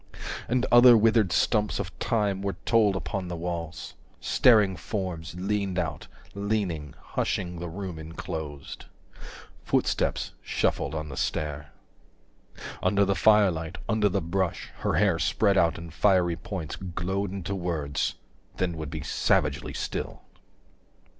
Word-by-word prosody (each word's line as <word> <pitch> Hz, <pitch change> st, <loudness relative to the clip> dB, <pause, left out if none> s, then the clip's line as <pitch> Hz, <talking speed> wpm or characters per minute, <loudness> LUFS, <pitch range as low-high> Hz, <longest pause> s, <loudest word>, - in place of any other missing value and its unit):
And 125 Hz, +1 st, +2 dB
other 120 Hz, 0 st, +9 dB
withered 110 Hz, -3 st, +3 dB
stumps 105 Hz, 0 st, +2 dB
of -, -, -5 dB
time 100 Hz, -4 st, 0 dB
Were 100 Hz, -3 st, -2 dB
told 110 Hz, -4 st, +4 dB
upon 95 Hz, -1 st, -3 dB
the 90 Hz, -, -4 dB
walls; 85 Hz, -2 st, -5 dB, 0.3 s
staring 105 Hz, -6 st, +4 dB
forms 90 Hz, -5 st, -4 dB
105 90 Hz, +2 st, -5 dB
Leaned 100 Hz, -3 st, 0 dB
out, 80 Hz, -5 st, -2 dB, 0.3 s
leaning, 100 Hz, -8 st, -2 dB
hushing 90 Hz, -2 st, -2 dB
the 85 Hz, 0 st, -5 dB
room 90 Hz, -1 st, -6 dB
enclosed. 80 Hz, -2 st, -7 dB, 0.8 s
Footsteps -, -, 0 dB
shuffled -, -, -1 dB
on 75 Hz, -1 st, -4 dB
the 70 Hz, -, -7 dB
stair, 75 Hz, -1 st, -2 dB, 1.1 s
Under 100 Hz, -1 st, +3 dB
the 100 Hz, -, +2 dB
firelight, 90 Hz, -4 st, +3 dB
under 110 Hz, -2 st, +2 dB
the -, -, 0 dB
brush, 90 Hz, +2 st, -2 dB
her -, -, 0 dB
hair -, -, +3 dB
Spread 100 Hz, -3 st, +2 dB
out 85 Hz, -3 st, +3 dB
in 85 Hz, 0 st, -8 dB
fiery 90 Hz, -1 st, +3 dB
points 85 Hz, -4 st, -6 dB
Glowed 95 Hz, +2 st, -3 dB
into 95 Hz, 0 st, -4 dB
words, 85 Hz, -6 st, -2 dB, 0.4 s
then 85 Hz, -3 st, -1 dB
would 80 Hz, -2 st, -5 dB
be -, -, -5 dB
savagely -, -, 0 dB
still. -, -, -4 dB
90 Hz, 135 wpm, -27 LUFS, 80-100 Hz, 1.1 s, other